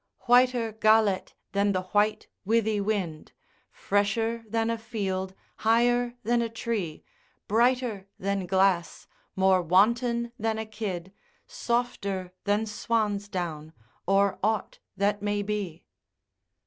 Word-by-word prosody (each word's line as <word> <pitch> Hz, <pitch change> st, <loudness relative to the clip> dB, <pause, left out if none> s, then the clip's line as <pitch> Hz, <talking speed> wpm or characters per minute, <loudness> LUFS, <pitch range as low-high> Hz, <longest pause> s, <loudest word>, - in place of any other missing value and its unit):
Whiter 245 Hz, -2 st, +3 dB
Galet 215 Hz, -3 st, +3 dB, 0.2 s
than 200 Hz, 0 st, +2 dB
the 185 Hz, 0 st, -1 dB
white 210 Hz, +1 st, +2 dB, 0.2 s
withie 220 Hz, 0 st, +1 dB
wind, 190 Hz, -7 st, -3 dB, 0.4 s
Fresher 225 Hz, +3 st, 0 dB
than 225 Hz, +1 st, 0 dB
a 230 Hz, -, -1 dB
field, 190 Hz, -4 st, -3 dB, 0.2 s
higher 240 Hz, +2 st, +2 dB
than 235 Hz, +2 st, +2 dB
a 230 Hz, -, -1 dB
tree, 220 Hz, -8 st, -3 dB, 0.4 s
Brighter 235 Hz, -3 st, +1 dB
than 195 Hz, -1 st, -2 dB
glass, 190 Hz, -2 st, +1 dB, 0.3 s
more 190 Hz, -1 st, +4 dB
wanton 235 Hz, +7 st, +2 dB
than 225 Hz, 0 st, 0 dB
a 220 Hz, -, -3 dB
kid, 195 Hz, -4 st, -5 dB, 0.3 s
Softer 235 Hz, -, -2 dB
than 205 Hz, +2 st, +1 dB
swan's 210 Hz, -1 st, -1 dB
down, 160 Hz, -5 st, -4 dB, 0.3 s
or 195 Hz, 0 st, +3 dB
ought 215 Hz, 0 st, -1 dB, 0.2 s
that 205 Hz, +1 st, +1 dB
may 205 Hz, 0 st, -1 dB
be. 200 Hz, -5 st, -4 dB
210 Hz, 115 wpm, -27 LUFS, 190-230 Hz, 0.4 s, more